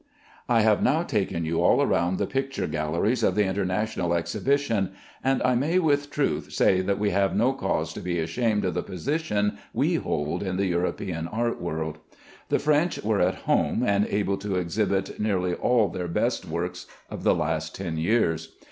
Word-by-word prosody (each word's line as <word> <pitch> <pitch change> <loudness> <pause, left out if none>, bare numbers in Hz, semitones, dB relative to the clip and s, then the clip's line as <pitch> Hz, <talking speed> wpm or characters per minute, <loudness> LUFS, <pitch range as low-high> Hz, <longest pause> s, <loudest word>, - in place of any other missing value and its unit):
I 115 -2 +4
have 110 -1 +3
now 155 +6 +3
taken 95 - -1
you 80 +1 0
all - - +4
round 90 +2 +1
the - - 0
picture 135 0 -2
galleries 85 +11 0
of - - +2
the 105 - +3
International 95 -1 -1
Exhibition, 105 +1 0 0.3
and 135 0 +1
I 125 - +3
may 145 +9 +1
with 145 -5 +2
truth 145 -1 -1
say 95 -1 +3
that 100 +1 0
we 105 0 +1
have 100 +1 +1
no 125 +5 +3
cause 80 -9 -2
to - - -6
be 90 -1 -2
ashamed 105 +6 0
of 90 - 0
the - - -1
position 105 - -1
we - - +2
hold 75 +4 -2
in 95 -2 -2
the 100 - +1
European 85 -1 -2
art 115 +4 -2
world. 80 -2 -3 0.5
The - - +3
French 155 +3 +1
were 105 -1 +1
at 90 +1 0
home 120 - +2
and 100 -2 +2
able 100 -1 0
to 100 -1 -3
exhibit 95 +2 -1
nearly 95 -4 0
all 115 +2 +2
their 90 -2 -4
best 85 - 0
works 85 +2 -4 0.2
of - - -6
the - - +3
last 80 0 -2
ten 85 -4 -4
years. 80 -3 0
100 Hz, 185 wpm, -26 LUFS, 85-115 Hz, 0.5 s, I